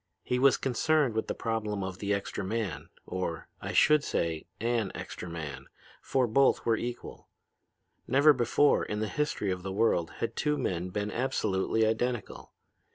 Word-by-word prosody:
He 125 Hz, -, 0 dB
was 135 Hz, +1 st, +5 dB
concerned 135 Hz, 0 st, +1 dB
with 110 Hz, -, -1 dB
the -, -, -2 dB
problem 105 Hz, -3 st, -2 dB
of 95 Hz, -1 st, -5 dB
the 100 Hz, 0 st, -2 dB
extra 100 Hz, 0 st, -2 dB
man, 95 Hz, -7 st, -3 dB, 0.2 s
or, 90 Hz, -3 st, -4 dB
I -, -, -4 dB
should 150 Hz, -1 st, +5 dB
say, 80 Hz, -2 st, -2 dB
an 115 Hz, -3 st, 0 dB
extra 90 Hz, -, -7 dB
man, 80 Hz, -4 st, -6 dB, 0.3 s
for 130 Hz, -2 st, +1 dB
both 135 Hz, +4 st, +3 dB
were 115 Hz, -, +3 dB
equal. 120 Hz, +2 st, -6 dB, 0.8 s
Never 140 Hz, +4 st, +6 dB
before 125 Hz, +3 st, +3 dB
in 105 Hz, -, -3 dB
the 110 Hz, -, -1 dB
history 125 Hz, -6 st, -1 dB
of 90 Hz, -1 st, -3 dB
the 95 Hz, +1 st, -5 dB
world 95 Hz, -5 st, +1 dB
had 115 Hz, -, -3 dB
two 150 Hz, -1 st, 0 dB
men 90 Hz, 0 st, -2 dB
been 105 Hz, +2 st, -3 dB
absolutely 110 Hz, -4 st, 0 dB
identical. 115 Hz, +1 st, -2 dB
110 Hz, 160 wpm, -29 LUFS, 95-125 Hz, 0.8 s, Never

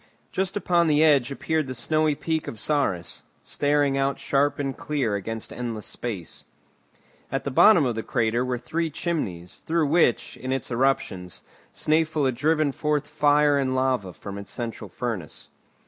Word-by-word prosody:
Just 190 Hz, +1 st, -1 dB
upon 175 Hz, -3 st, +2 dB
the 150 Hz, 0 st, +4 dB
edge 140 Hz, -5 st, +4 dB
appeared 155 Hz, +1 st, -1 dB
the 130 Hz, -, -5 dB
snowy 155 Hz, +4 st, +1 dB
peak 160 Hz, +1 st, -2 dB
of 110 Hz, -, -6 dB
Saris, 100 Hz, -, -1 dB, 0.2 s
standing 145 Hz, -1 st, +1 dB
out 135 Hz, 0 st, 0 dB
sharp 140 Hz, 0 st, +1 dB
and 135 Hz, -2 st, -2 dB
clear 140 Hz, -8 st, -1 dB
against 110 Hz, +2 st, -4 dB
endless 115 Hz, -3 st, -5 dB
space. 100 Hz, -9 st, -5 dB, 0.9 s
At 135 Hz, -, -1 dB
the 140 Hz, -, -3 dB
bottom 170 Hz, +2 st, +6 dB
of 120 Hz, -, 0 dB
the 110 Hz, -, -3 dB
crater 115 Hz, +2 st, 0 dB
were 125 Hz, -1 st, -1 dB
three 160 Hz, +7 st, -2 dB
chimneys, 120 Hz, -, -4 dB
through 165 Hz, -1 st, 0 dB
which, 145 Hz, -5 st, +2 dB
in 130 Hz, -, -5 dB
its 135 Hz, -2 st, -2 dB
eruptions, 115 Hz, -8 st, -1 dB, 0.3 s
Snæfell 155 Hz, -1 st, +1 dB
had 130 Hz, -, +2 dB
driven 155 Hz, +2 st, +2 dB
forth 150 Hz, +1 st, -1 dB
fire 150 Hz, -1 st, +3 dB
and 130 Hz, -1 st, 0 dB
lava 130 Hz, -7 st, 0 dB
from 100 Hz, +2 st, -8 dB
its 100 Hz, -, -9 dB
central 115 Hz, -3 st, -5 dB
furnace. 110 Hz, -, -5 dB
135 Hz, 165 wpm, -25 LUFS, 115-150 Hz, 0.9 s, bottom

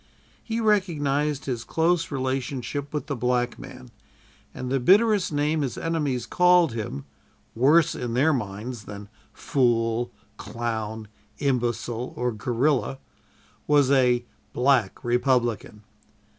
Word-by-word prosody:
He 225 Hz, 0 st, -3 dB
recognized 150 Hz, -9 st, +1 dB
his 120 Hz, -4 st, -3 dB
close 165 Hz, +3 st, +1 dB
relationship 135 Hz, +1 st, -3 dB
with 150 Hz, -, -3 dB
the 140 Hz, -, -3 dB
black 125 Hz, 0 st, -1 dB
man, 125 Hz, -1 st, -11 dB, 0.6 s
and 130 Hz, 0 st, -6 dB
the 135 Hz, -, +2 dB
bitterest 205 Hz, -, +4 dB
name 150 Hz, +1 st, 0 dB
his 135 Hz, -4 st, -3 dB
enemies 150 Hz, -7 st, -1 dB
called 180 Hz, -5 st, +4 dB
him 100 Hz, -12 st, -5 dB, 0.5 s
worse 145 Hz, +7 st, +4 dB
in 120 Hz, -1 st, -4 dB
their 150 Hz, +5 st, +3 dB
minds 110 Hz, -1 st, -5 dB
than 100 Hz, 0 st, -9 dB, 0.2 s
"fool," 120 Hz, -2 st, 0 dB, 0.3 s
"clown," 110 Hz, -2 st, -4 dB, 0.3 s
"imbecile" 120 Hz, -3 st, -2 dB
or 125 Hz, 0 st, 0 dB
"gorilla" 125 Hz, +5 st, 0 dB, 0.7 s
was 145 Hz, -2 st, +4 dB
a 125 Hz, -3 st, +3 dB, 0.3 s
"Black 125 Hz, -5 st, +1 dB
Republican." 120 Hz, -4 st, 0 dB
130 Hz, 115 wpm, -25 LUFS, 120-145 Hz, 0.7 s, bitterest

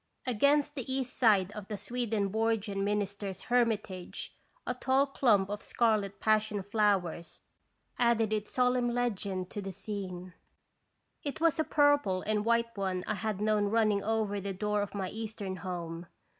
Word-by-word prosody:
Against 280 Hz, +5 st, +3 dB
the 260 Hz, -3 st, -5 dB
east 260 Hz, -2 st, -2 dB
side 205 Hz, -5 st, +4 dB
of 210 Hz, -2 st, -8 dB
the 210 Hz, -, -4 dB
Swedenborgian 215 Hz, -2 st, -1 dB
minister's 200 Hz, -1 st, -2 dB
hermitage 215 Hz, -7 st, -1 dB, 0.3 s
a 250 Hz, -, -1 dB
tall 265 Hz, +2 st, +2 dB
clump 230 Hz, -8 st, +3 dB
of 210 Hz, 0 st, -4 dB
scarlet 215 Hz, -4 st, +1 dB
passion 215 Hz, -2 st, +1 dB
flowers 195 Hz, -5 st, 0 dB, 0.6 s
added 230 Hz, -3 st, +3 dB
its 210 Hz, -1 st, -2 dB
solemn 250 Hz, -1 st, +2 dB
legend 200 Hz, -6 st, -2 dB
to 205 Hz, -, -4 dB
the 195 Hz, 0 st, -5 dB
scene. 185 Hz, -2 st, -6 dB, 0.9 s
It 285 Hz, 0 st, -4 dB
was 325 Hz, -1 st, +3 dB
a -, -, +4 dB
purple 290 Hz, -12 st, +3 dB
and 210 Hz, -1 st, 0 dB
white 235 Hz, 0 st, +1 dB
one 190 Hz, -2 st, -2 dB
I -, -, -1 dB
had 215 Hz, -1 st, -3 dB
known 210 Hz, -1 st, +2 dB
running 210 Hz, -1 st, +2 dB
over 215 Hz, -2 st, 0 dB
the 195 Hz, 0 st, -3 dB
door 210 Hz, +2 st, 0 dB
of 205 Hz, 0 st, -4 dB
my 190 Hz, -2 st, -2 dB
eastern 210 Hz, -4 st, -5 dB
home. 175 Hz, -2 st, -5 dB
210 Hz, 150 wpm, -31 LUFS, 195-235 Hz, 0.9 s, side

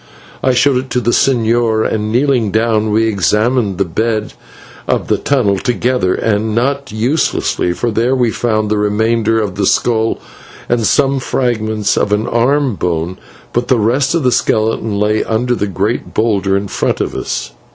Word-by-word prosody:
I 130 Hz, -1 st, +2 dB
showed 135 Hz, +1 st, +3 dB
it 130 Hz, +1 st, -4 dB
to 125 Hz, -, 0 dB
the 120 Hz, -1 st, 0 dB
señor, 115 Hz, -3 st, +2 dB
and, 110 Hz, -1 st, -2 dB
kneeling 125 Hz, -3 st, +1 dB
down, 110 Hz, 0 st, +1 dB
we 110 Hz, +2 st, +2 dB
examined 105 Hz, +1 st, +1 dB
the 100 Hz, -, +1 dB
bed 110 Hz, +5 st, -2 dB, 0.5 s
of -, -, -1 dB
the -, -, +1 dB
tunnel 110 Hz, -9 st, +1 dB
together, 120 Hz, -5 st, 0 dB
and 110 Hz, 0 st, -1 dB
not 135 Hz, +2 st, -1 dB
uselessly, 110 Hz, -, 0 dB
for 120 Hz, +5 st, -2 dB
there 120 Hz, +4 st, +1 dB
we 120 Hz, -3 st, +1 dB
found 110 Hz, -3 st, -1 dB
the 105 Hz, -, +1 dB
remainder 110 Hz, +2 st, +1 dB
of 100 Hz, -3 st, -3 dB
the 100 Hz, -2 st, +1 dB
skull 115 Hz, -2 st, +1 dB, 0.5 s
and 115 Hz, -3 st, +1 dB
some 135 Hz, -1 st, +2 dB
fragments 110 Hz, -5 st, -1 dB
of 100 Hz, -, 0 dB
an 105 Hz, +2 st, +1 dB
arm 130 Hz, +3 st, +1 dB
bone, 85 Hz, -1 st, -3 dB, 0.3 s
but 120 Hz, +1 st, -1 dB
the 130 Hz, -, +3 dB
rest 130 Hz, +8 st, +1 dB
of 165 Hz, -, 0 dB
the 125 Hz, -, +3 dB
skeleton 110 Hz, -2 st, 0 dB
lay 105 Hz, +1 st, +1 dB
under 120 Hz, +2 st, 0 dB
the 105 Hz, -, -1 dB
great 100 Hz, +4 st, -3 dB
boulder 100 Hz, -3 st, +1 dB
in 100 Hz, +1 st, -3 dB
front -, -, -1 dB
of -, -, -2 dB
us. -, -, -4 dB
110 Hz, 170 wpm, -15 LUFS, 105-125 Hz, 0.5 s, showed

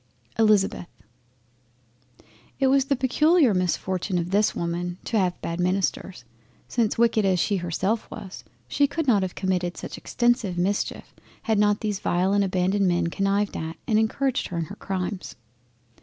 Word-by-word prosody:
—— -, -, -22 dB
ELIZABETH 210 Hz, -5 st, +3 dB, 1.7 s
It 270 Hz, -, +2 dB
was 270 Hz, 0 st, +3 dB
the 275 Hz, 0 st, +1 dB
peculiar 280 Hz, -, +3 dB
misfortune 185 Hz, +1 st, -1 dB
of 175 Hz, +1 st, -2 dB
this 205 Hz, +2 st, +2 dB
Woman 175 Hz, +1 st, -3 dB
to 225 Hz, -, 0 dB
have 180 Hz, -2 st, 0 dB
bad 170 Hz, +1 st, -3 dB
Ministers—Since 195 Hz, +4 st, -2 dB
wicked 230 Hz, -2 st, +3 dB
as 190 Hz, -2 st, +2 dB
she 200 Hz, +3 st, +1 dB
herself 190 Hz, +5 st, -2 dB
was, 185 Hz, -9 st, -9 dB, 0.2 s
she 285 Hz, -, +2 dB
could 325 Hz, +2 st, -3 dB
not 220 Hz, -7 st, +4 dB
have 185 Hz, -1 st, -3 dB
committed 180 Hz, -2 st, -1 dB
such -, -, -7 dB
extensive 240 Hz, -6 st, 0 dB
mischeif, 190 Hz, +4 st, -2 dB, 0.3 s
had 220 Hz, -2 st, +1 dB
not 205 Hz, 0 st, +2 dB
these 210 Hz, -3 st, -2 dB
vile 185 Hz, +2 st, +1 dB
and 200 Hz, 0 st, +3 dB
abandoned 190 Hz, +1 st, +1 dB
Men 175 Hz, -1 st, +1 dB
connived 200 Hz, +1 st, 0 dB
at, 160 Hz, +1 st, -5 dB
and 215 Hz, -3 st, +3 dB
encouraged 260 Hz, +4 st, 0 dB
her 175 Hz, -, -5 dB
in 165 Hz, -, -1 dB
her 200 Hz, -, -9 dB
Crimes. 190 Hz, -1 st, -4 dB
195 Hz, 155 wpm, -25 LUFS, 180-220 Hz, 1.7 s, not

